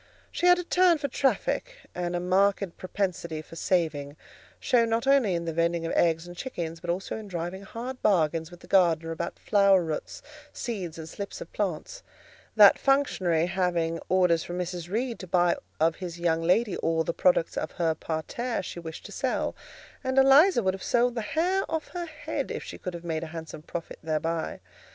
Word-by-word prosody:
She 355 - +1
had 355 0 +7
a 355 - -2
turn 355 -1 +4
for 285 - -2
traffic, 280 - 0 0.2
and 175 0 -2
a - - 0
marked 190 +1 +1
propensity 180 -4 -3
for 165 - -13
saving; 155 -5 -1 0.4
shown 235 -2 +3
not 230 +2 0
only 270 -9 +4
in 170 0 -2
the 165 - -2
vending 170 +1 0
of 165 - -2
eggs 165 0 +2
and 175 0 -10
chickens, 170 -7 -5
but 170 - -8
also 180 +5 -2
in 215 -1 -8
driving 175 +1 -4
hard 245 +6 -7
bargains 165 -4 +2
with 175 0 -14
the - - -14
gardener 165 -4 +3
about 170 +1 -4
flower 200 -3 +4
roots, 160 -2 -5 0.3
seeds, 190 -9 -5
and 160 -1 -7
slips 200 - -7
of - - -10
plants; - - -3 0.5
that - - +8
functionary 190 - +2
having 175 -2 0
orders 180 -3 +3
from 175 - -5
Mrs. 175 -1 -4
Reed 235 +4 -2
to 185 - -8
buy 175 -1 +3 0.2
of 160 +1 +2
his 175 -2 -6
young 165 -1 +1
lady 190 +5 +2
all 165 0 +1
the 170 - -2
products 175 -2 +2
of 155 - -3
her 165 -3 +1
parterre 170 +10 -3
she 175 - -6
wished 160 -2 -8
to - - -9
sell: - - -1 0.5
and 260 0 -1
Eliza 270 - +6
would 190 0 +2
have 195 - -7
sold 245 +3 +2
the 235 - -2
hair 355 - 0
off 320 -2 -3
her 350 -1 -5
head 310 -2 -4
if - - -4
she - - -9
could 180 -2 -5
have 170 0 -9
made 160 -1 -2
a - - -5
handsome 160 -1 -8
profit 165 +1 -7
thereby. 160 +1 -2
180 Hz, 195 wpm, -27 LUFS, 165-230 Hz, 0.5 s, that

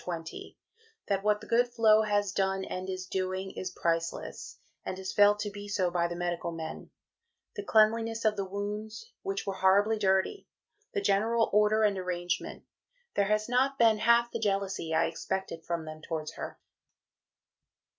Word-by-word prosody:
20), 165 -2 -6 0.5
"that 195 -1 +1
what 210 0 +2
the - - -10
good 240 +2 +3
Flo 225 -3 +4
has 205 -2 +1
done 195 -1 0
and 185 +1 -5
is 185 0 -4
doing 185 +1 -3
is 185 - -5
priceless, 165 0 -2 0.3
and 185 - -4
is 190 0 -5
felt 205 0 +6
to 210 0 -3
be 205 0 -8
so 185 -3 0
by 170 -1 +1
the 170 - -5
medical 175 -1 -2
men 160 -1 -7 0.7
the 415 - -3
cleanliness 225 - +2
of 215 -1 +3
the 200 - -2
wounds, 210 - -5
which 390 0 -3
were 195 - -2
horribly 200 +3 +3
dirty, 190 - +1 0.5
the 405 - +1
general 225 - +2
order 210 +1 +4
and 200 -2 +2
arrangement. 180 -1 -3 0.5
There 200 - +2
has 215 +1 +1
not 260 +3 +2
been 225 -2 +4
half 235 +1 +4
the 230 - -3
jealousy 195 -5 -1
I 160 +1 +3
expected 190 -3 -4
from 170 -2 -3
them 155 0 -8
towards 155 -1 -4
her." - - -7
200 Hz, 165 wpm, -30 LUFS, 185-220 Hz, 0.7 s, felt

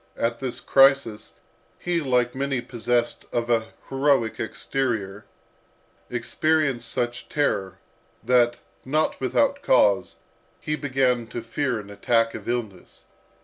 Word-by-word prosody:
at 115 0 -1
this 130 -2 -2
crisis, 135 -6 +3 0.4
he, 175 -1 -1
like 125 -3 +1
many 135 -1 -1
possessed 120 0 -1
of 120 0 -1
an 115 -1 +2 0.2
heroic 135 -4 +1
exterior, 110 -7 -2 0.8
experienced 150 -7 0
such 120 0 -2
terror, 95 -10 -1 0.5
that, 120 -1 +3 0.3
not 155 +2 0
without 280 - +1
cause, - - +3 0.4
he 155 -1 -2
began 130 -5 0
to 120 - -5
fear 125 0 -2
an 100 -1 -10
attack 115 +2 +1
of - - -7
illness. 110 -7 -5
125 Hz, 115 wpm, -24 LUFS, 115-135 Hz, 0.8 s, crisis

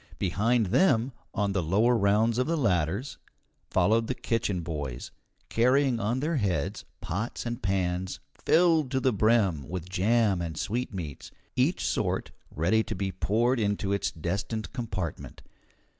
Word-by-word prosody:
Behind 110 +6 +1
them, 125 - +3 0.2
on 100 -1 0
the 95 -1 0
lower 105 +9 +3
rounds 110 +2 +2
of 125 - +1
the 165 +1 +1
ladders, 100 - 0 0.5
followed 115 +1 +2
the 130 - -2
kitchen 110 -7 -1
boys, 75 -7 -5 0.4
carrying 125 +1 +3
on 115 +5 -1
their 155 +2 0
heads 100 -7 -1 0.2
pots 110 +9 -4
and 120 0 -4
pans 95 -2 -1 0.2
filled 165 -5 +4
to 130 0 0
the 130 -1 +2
brim 100 - +2
with 90 -1 -5
jam 100 0 +2
and 80 -3 -4
sweetmeats, 95 - -4 0.3
each - - +1
sort - - -1 0.2
ready 90 +8 +2
to - - -4
be 95 0 -2
poured 115 +7 +1
into 100 -2 0
its 100 - 0
destined 100 - -4
compartment. 95 - -5
105 Hz, 145 wpm, -28 LUFS, 90-120 Hz, 0.5 s, filled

